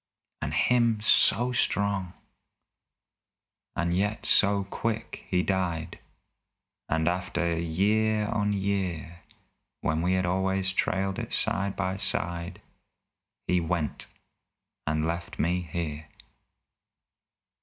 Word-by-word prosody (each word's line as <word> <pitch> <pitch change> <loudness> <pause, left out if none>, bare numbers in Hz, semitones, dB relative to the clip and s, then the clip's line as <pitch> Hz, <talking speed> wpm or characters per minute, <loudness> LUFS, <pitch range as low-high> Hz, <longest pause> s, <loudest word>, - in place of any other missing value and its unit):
And - - -2
him 120 -3 +3
so 120 +3 +4
strong, 100 -6 +1 1.6
and 85 +1 0
yet 105 +3 -1
so 100 -1 +4
quick 110 +3 -3
he 90 -1 +2
died, 90 -5 -1 0.9
And 80 0 +1
after 85 -1 0
year 105 +6 +2
on 105 -1 0
year 95 -4 -2 0.6
When 80 +1 0
we 90 +2 +2
had 95 -1 +1
always 95 +1 0
trailed 95 +1 0
it - - -5
side 100 0 0
by 95 -1 -1
side, 85 -3 -2 0.8
He 90 0 +2
went 80 -2 -2 0.8
and 80 +1 +1
left 85 +1 -3
me 90 +2 +1
here! 80 -2 -4
95 Hz, 100 wpm, -28 LUFS, 85-100 Hz, 1.6 s, so